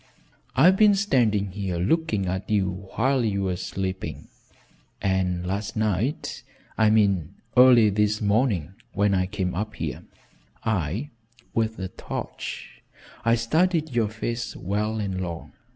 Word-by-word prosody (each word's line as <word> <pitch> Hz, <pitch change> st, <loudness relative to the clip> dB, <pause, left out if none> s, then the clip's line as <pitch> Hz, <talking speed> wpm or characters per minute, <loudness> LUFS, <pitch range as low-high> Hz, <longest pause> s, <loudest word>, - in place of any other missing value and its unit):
I've 175 Hz, +9 st, +6 dB
been 210 Hz, -1 st, +6 dB
standing 115 Hz, -, +2 dB
here 95 Hz, -3 st, -3 dB
looking 105 Hz, -, +1 dB
at 95 Hz, +1 st, -3 dB
you 95 Hz, -2 st, -1 dB
while 130 Hz, +2 st, +2 dB
you 100 Hz, -3 st, 0 dB
were 95 Hz, -1 st, 0 dB
sleeping, 95 Hz, +1 st, -4 dB, 0.7 s
and 90 Hz, -2 st, 0 dB
last 100 Hz, +3 st, -3 dB
night 110 Hz, -, -1 dB, 0.3 s
I 110 Hz, -1 st, +4 dB
mean 100 Hz, -5 st, +2 dB, 0.2 s
early 125 Hz, -4 st, +7 dB
this 105 Hz, +1 st, +1 dB
morning 100 Hz, -, +1 dB, 0.2 s
when 100 Hz, 0 st, +2 dB
I 95 Hz, -1 st, +1 dB
came 95 Hz, -2 st, -2 dB
up 105 Hz, +3 st, -3 dB
here, -, -, -4 dB, 0.6 s
I 110 Hz, -, -1 dB, 0.4 s
with 110 Hz, -1 st, 0 dB
a 95 Hz, -1 st, -4 dB
torch -, -, -7 dB, 0.4 s
I 115 Hz, 0 st, +4 dB
studied 160 Hz, +6 st, +1 dB
your 115 Hz, -3 st, +1 dB
face 115 Hz, +2 st, -4 dB
well 105 Hz, +4 st, -2 dB
and 95 Hz, -3 st, -2 dB
long. 85 Hz, -2 st, -6 dB
105 Hz, 135 wpm, -25 LUFS, 95-115 Hz, 0.7 s, early